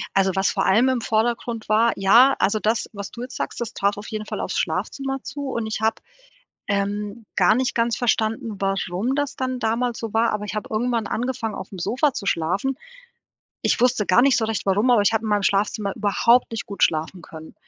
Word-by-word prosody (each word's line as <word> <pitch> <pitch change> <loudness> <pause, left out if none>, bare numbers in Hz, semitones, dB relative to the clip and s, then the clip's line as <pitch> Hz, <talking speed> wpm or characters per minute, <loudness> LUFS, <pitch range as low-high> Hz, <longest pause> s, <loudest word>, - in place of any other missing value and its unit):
Also, 195 -1 +3
was 195 0 +2
vor - - 0
allem 235 +7 +4
im 250 -3 0
Vordergrund 225 0 -1
war 225 +2 +4
ja, 230 +8 +5
also, 215 +2 +2
das, 220 +2 0
was 200 -1 -7
du 235 - -9
jetzt 250 +1 -7
sagst, - - -4
das 235 -1 -4
trat 200 +1 0
auf 205 - -8
jeden 215 -1 -5
Fall - - -5
aufs - - -3
Schlafzimmer 270 -1 -2
zu 285 0 -6
und 230 -3 -3
ich 220 0 -4
habe, 220 0 +2 0.7
ähm, 205 +2 -2
gar 215 - +5
nicht 255 +1 0
ganz 230 0 +1
verstanden, 225 -2 -1
warum 195 +4 -1
das 285 0 -2
dann 255 -1 -3
damals 230 +1 -1
so 225 -2 -5
war, 225 +1 +2
aber 210 0 -3
ich 210 - -5
habe 210 - -4
irgendwann 230 0 0
angefangen 235 -2 -3
aufm 190 0 -8
Sofa 265 - +1
zu 200 - -6
schlafen. 195 +12 0 0.8
Ich - - +1
wusste 240 -4 +2
gar 185 +6 +5
nicht 275 0 +4
so 220 - 0
recht 220 -1 -2
warum, 205 +6 +2
aber 230 -4 +5
ich 205 - +3
habe 225 - 0
in - - -2
meinem 205 -1 +1
Schlafzimmer 200 0 0
überhaupt 230 +4 +3
nicht 225 -3 -4
gut 200 - -6
schlafen 160 +3 +1
können. 160 -1 -11
220 Hz, 215 wpm, -23 LUFS, 200-240 Hz, 0.8 s, ja